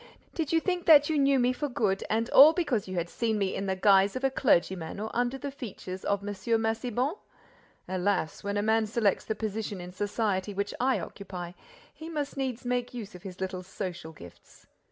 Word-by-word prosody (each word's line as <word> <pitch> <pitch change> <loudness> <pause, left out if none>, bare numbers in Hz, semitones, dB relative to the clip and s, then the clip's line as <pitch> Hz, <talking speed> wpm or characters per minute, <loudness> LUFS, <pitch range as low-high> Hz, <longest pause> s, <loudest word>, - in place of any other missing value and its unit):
"Did 315 -3 -2
you 330 - +4
think 360 0 -2
that 295 -1 +7
you 305 - +2
knew 275 0 +4
me 250 0 +2
for 290 +3 -3
good 205 -6 0
and 225 +1 +1
all 295 +4 +9
because 290 - -1
you 185 - -5
had 170 -1 -1
seen 220 +4 -1
me 195 -2 0
in 195 - -3
the 190 - 0
guise 195 +1 +4
of 255 - -4
a 270 - +2
clergyman 185 -8 +1
or 215 +1 -4
under 245 +2 0
the 280 +1 -5
features 190 -8 -7
of 200 -1 0
M. 205 - -4 0.3
Massiban? 240 - -1 0.7
Alas, 185 -3 -1
when 200 0 -2
a 205 - +1
man 220 0 +2
selects 210 -3 +1
the 220 - -2
position 215 -2 -4
in 180 0 -8
society 205 0 -1
which 200 +1 -2
I 260 +1 +2
occupy, 180 -3 -7 0.4
he 320 +1 -9
must 295 -3 -3
needs 260 -3 -3
make 245 0 -1
use 215 -4 -7
of 180 - -11
his 185 -1 -9
little 185 -1 -3
social 180 -3 -6
gifts! 90 - -15
215 Hz, 205 wpm, -28 LUFS, 190-255 Hz, 0.7 s, all